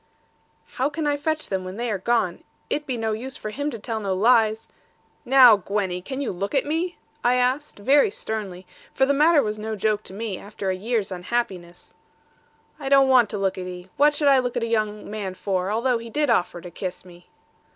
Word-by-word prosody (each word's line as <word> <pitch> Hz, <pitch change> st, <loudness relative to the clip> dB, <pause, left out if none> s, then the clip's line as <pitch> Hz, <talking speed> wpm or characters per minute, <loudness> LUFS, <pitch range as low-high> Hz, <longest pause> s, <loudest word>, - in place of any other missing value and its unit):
'How 265 Hz, +3 st, +1 dB
can 310 Hz, +1 st, -4 dB
I 290 Hz, -1 st, +2 dB
fetch 310 Hz, +2 st, -2 dB
them, 190 Hz, -1 st, -2 dB
when 185 Hz, +2 st, -7 dB
they 240 Hz, 0 st, -2 dB
are 200 Hz, -, -2 dB
gone? 210 Hz, -4 st, 0 dB, 0.3 s
It 295 Hz, 0 st, -1 dB
be 255 Hz, -3 st, -2 dB
no 225 Hz, -1 st, -1 dB
use 250 Hz, +5 st, -5 dB
for 215 Hz, -, -6 dB
him 285 Hz, +6 st, -2 dB
to 235 Hz, -, -6 dB
tell 225 Hz, +1 st, -4 dB
no 195 Hz, -3 st, -1 dB
lies 220 Hz, +1 st, +3 dB, 0.3 s
' -, -, -39 dB
'Now, 250 Hz, -4 st, +8 dB
Gwenny, 195 Hz, -2 st, -2 dB
can 265 Hz, +8 st, -6 dB
you 275 Hz, -, -2 dB
look 200 Hz, +8 st, -4 dB
at 270 Hz, -, +2 dB
me?' 330 Hz, +4 st, -2 dB, 0.3 s
I 245 Hz, +1 st, +3 dB
asked, 255 Hz, +4 st, 0 dB
very 280 Hz, -, +4 dB
sternly; 205 Hz, -, -5 dB, 0.3 s
for 265 Hz, -, +4 dB
the 280 Hz, -, +2 dB
matter 300 Hz, +1 st, +4 dB
was 215 Hz, 0 st, -3 dB
no 220 Hz, +1 st, -4 dB
joke 210 Hz, 0 st, 0 dB
to -, -, -8 dB
me, 205 Hz, -2 st, -4 dB
after 200 Hz, -2 st, -4 dB
a -, -, -1 dB
year's 215 Hz, +1 st, -2 dB
unhappiness. 180 Hz, -2 st, -4 dB, 0.9 s
'I 270 Hz, -2 st, -4 dB
don't 275 Hz, -1 st, +5 dB
want 245 Hz, -5 st, +5 dB
to 210 Hz, -, -3 dB
look 195 Hz, -1 st, -1 dB
at 180 Hz, -, -5 dB
'ee. 180 Hz, 0 st, -9 dB
What 295 Hz, +1 st, +4 dB
should 290 Hz, -, +1 dB
I 275 Hz, -1 st, +6 dB
look 245 Hz, -1 st, -2 dB
at -, -, -1 dB
a -, -, +1 dB
young 215 Hz, -2 st, -1 dB
man 205 Hz, -3 st, -5 dB
for, 185 Hz, -1 st, -2 dB
although 235 Hz, +3 st, +1 dB
he 230 Hz, 0 st, -9 dB
did 295 Hz, +4 st, +1 dB
offer 175 Hz, -1 st, 0 dB
to 175 Hz, -, -10 dB
kiss 185 Hz, +1 st, -6 dB
me?' 175 Hz, -1 st, -16 dB
220 Hz, 225 wpm, -24 LUFS, 195-265 Hz, 0.9 s, Now